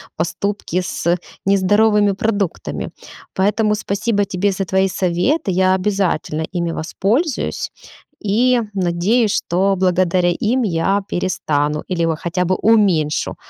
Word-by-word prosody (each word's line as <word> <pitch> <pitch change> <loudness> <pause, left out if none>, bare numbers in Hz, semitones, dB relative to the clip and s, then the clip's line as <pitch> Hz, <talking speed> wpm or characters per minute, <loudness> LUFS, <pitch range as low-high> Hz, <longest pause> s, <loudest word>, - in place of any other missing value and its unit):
поступки 185 +2 -2
с 175 0 -1 0.3
нездоровыми 205 +2 +3
продуктами. 200 -3 -2 0.4
Поэтому 210 +2 +1
спасибо 205 0 -1
тебе 195 +1 0
за 195 0 -2
твои 190 +2 +2
советы. 185 - 0
Я 185 +1 +3
обязательно 185 -5 -1
ими 170 -2 -1
воспользуюсь 220 - -1 0.5
и 240 +5 +3
надеюсь, 195 +5 +1
что 195 +3 +1
благодаря 180 -1 +2
им 245 +7 0
я 195 +1 +1
перестану 150 -5 -1
или 170 -3 0
вот 165 -1 -1
хотя 180 +1 -1
бы 185 +2 +1
уменьшу, 185 -10 +2
190 Hz, 115 wpm, -19 LUFS, 175-210 Hz, 0.5 s, нездоровыми